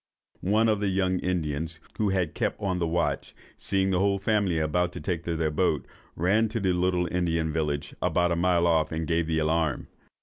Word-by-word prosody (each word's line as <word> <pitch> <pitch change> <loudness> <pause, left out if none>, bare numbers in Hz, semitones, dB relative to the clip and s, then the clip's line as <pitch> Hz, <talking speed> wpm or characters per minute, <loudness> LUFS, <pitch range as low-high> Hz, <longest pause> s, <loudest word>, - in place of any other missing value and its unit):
One 110 +2 +4
of 105 -2 +2
the 105 - 0
young 95 -1 +1
Indians, 80 -2 -2 0.2
who 105 -2 +2
had 90 -5 0
kept - - -2
on 95 -3 -1
the 85 - 0
watch, 85 0 -1 0.2
seeing 95 -1 0
the 90 - +2
whole 100 0 +2
family 100 -3 +1
about 85 +3 +1
to - - -6
take 85 -3 -3
their 80 -2 0
boat, 75 - +1 0.3
ran 105 +7 +2
to 115 +2 -2
the 95 -3 +1
little 90 0 +1
Indian 85 -3 0
village, 75 -2 -2
about 90 0 +2
a - - +2
mile 85 0 +2
off, 80 -2 +2
and 80 0 -2
gave 80 0 0
the 80 -1 0
alarm. 80 -2 0
90 Hz, 200 wpm, -27 LUFS, 80-95 Hz, 0.3 s, One